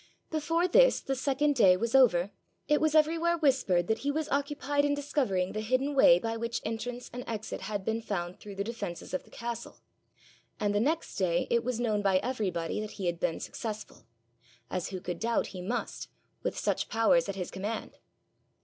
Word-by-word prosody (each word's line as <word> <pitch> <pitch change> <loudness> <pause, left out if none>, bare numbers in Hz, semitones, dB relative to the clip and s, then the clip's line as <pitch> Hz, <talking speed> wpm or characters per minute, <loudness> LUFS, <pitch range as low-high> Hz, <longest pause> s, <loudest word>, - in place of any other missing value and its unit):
Before 330 +3 +1
this, - - +5
the 270 - -2
second 275 +2 +1
day, 190 -7 +6
was 230 +3 -2
over, 205 -8 +5 0.4
it 300 0 +3
was 315 0 +2
everywhere 330 +2 +3
whispered 260 - +2
that 220 +4 0
he 285 - -2
was 305 +1 -1
occupied 285 0 0
in 290 0 +2
discovering 255 -11 0
the 215 +1 -3
hidden 255 +6 0
way 220 -10 +7
by 225 +5 -3
which 235 +1 -2
entrance 240 +2 -4
and 250 +1 -5
exit 220 -3 -4
had 200 0 -4
been 225 +1 -1
found 180 -5 -4
through 205 -1 -9
the 200 - -1
defences 205 -7 -6
of 185 - -2
the - - -19
castle; 235 0 -6 0.8
and 205 -1 +1
the 205 - +2
next 305 +8 -1
day 175 -3 +1
it 235 0 +3
was 245 -1 -2
known 215 -4 +1
by 195 -2 +3
everybody 185 -8 -2
that 215 - -6
he 195 - -5
had 170 -1 -1
been 165 - 0
successful 215 - -6 0.6
as 180 - -2
who 190 - -5
could 175 -1 -5
doubt 230 +1 +1
he 185 - -6
must, 230 +7 -3 0.3
with - - -2
such - - -1
powers 220 -6 +3
at 200 - -3
his 180 -3 -4
command? 205 +4 -5
225 Hz, 195 wpm, -30 LUFS, 195-280 Hz, 0.8 s, way